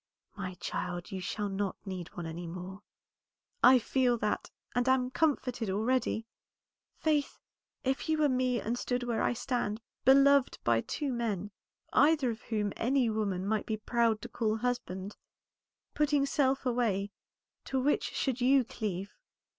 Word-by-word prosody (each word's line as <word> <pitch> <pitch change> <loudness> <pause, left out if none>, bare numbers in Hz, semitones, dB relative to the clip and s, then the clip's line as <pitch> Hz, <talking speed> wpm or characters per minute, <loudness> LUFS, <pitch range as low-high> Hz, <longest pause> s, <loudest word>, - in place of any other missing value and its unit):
"My 185 -1 -5
child, 175 +1 -4
you 190 -1 -4
shall 205 +3 -2
not 195 0 -2
need 185 -3 -5
one 175 - -4
any 165 +2 -5
more." 185 +3 -7 0.8
"I 255 +1 +8
feel 245 +1 +2
that, 210 -2 -1 0.2
and 245 +1 +1
am 255 -1 +2
comforted 255 -7 0
already. 225 +2 0 0.7
Faith, 300 -3 0 0.5
if 265 +4 -1
you 315 - +3
were 305 -1 +4
me, 255 -2 +1
and 235 +3 -2
stood 245 0 -1
where 240 -2 -1
I - - +2
stand, 235 -3 -2 0.2
beloved 275 +1 +5
by 115 -1 +3
two 280 - -3
men, 210 -4 -2 0.4
either 290 -3 +4
of 220 - -7
whom 210 -3 -2
any 250 -1 +2
woman 200 -4 -1
might 215 +1 -1
be 220 -2 -1
proud 225 -1 +1
to - - -4
call 220 -2 -1
husband, 215 -5 -3 0.8
putting 295 -2 +2
self 275 -1 +1
away, 220 -5 0 0.5
to 265 - -1
which 285 +3 +2
should 260 -2 -2
you 265 +1 +5
cleave?" 200 -4 -4
235 Hz, 150 wpm, -31 LUFS, 205-260 Hz, 0.8 s, I